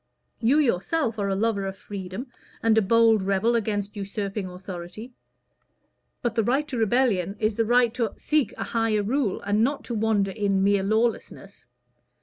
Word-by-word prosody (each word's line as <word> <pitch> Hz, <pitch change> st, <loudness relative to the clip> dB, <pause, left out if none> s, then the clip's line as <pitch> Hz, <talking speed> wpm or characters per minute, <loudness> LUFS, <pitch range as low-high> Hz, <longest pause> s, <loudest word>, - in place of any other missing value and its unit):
You 240 Hz, +6 st, +3 dB
yourself 235 Hz, -, 0 dB
are 200 Hz, -1 st, 0 dB
a 195 Hz, -, 0 dB
lover 205 Hz, -1 st, 0 dB
of 195 Hz, 0 st, -6 dB
freedom, 195 Hz, +3 st, -7 dB, 0.4 s
and 225 Hz, -1 st, +4 dB
a 220 Hz, -, +5 dB
bold 225 Hz, +1 st, +4 dB
rebel 195 Hz, +4 st, +1 dB
against 205 Hz, -2 st, -2 dB
usurping 200 Hz, -1 st, -4 dB
authority. 180 Hz, +5 st, -8 dB, 1.1 s
But 240 Hz, -, 0 dB
the 225 Hz, -1 st, +1 dB
right 270 Hz, +7 st, +1 dB
to 255 Hz, -, -3 dB
rebellion 215 Hz, -5 st, +1 dB
is 215 Hz, 0 st, 0 dB
the 225 Hz, -, +1 dB
right 240 Hz, 0 st, +3 dB
to 230 Hz, -3 st, -2 dB
seek 300 Hz, -3 st, +1 dB
a -, -, -3 dB
higher 225 Hz, -2 st, 0 dB
rule, 235 Hz, -2 st, -1 dB
and 205 Hz, +2 st, +1 dB
not 275 Hz, +4 st, -1 dB
to 240 Hz, -, -5 dB
wander 215 Hz, -3 st, +1 dB
in 195 Hz, -1 st, 0 dB
mere 200 Hz, 0 st, +3 dB
lawlessness. 205 Hz, -, -2 dB
215 Hz, 165 wpm, -25 LUFS, 195-235 Hz, 1.1 s, a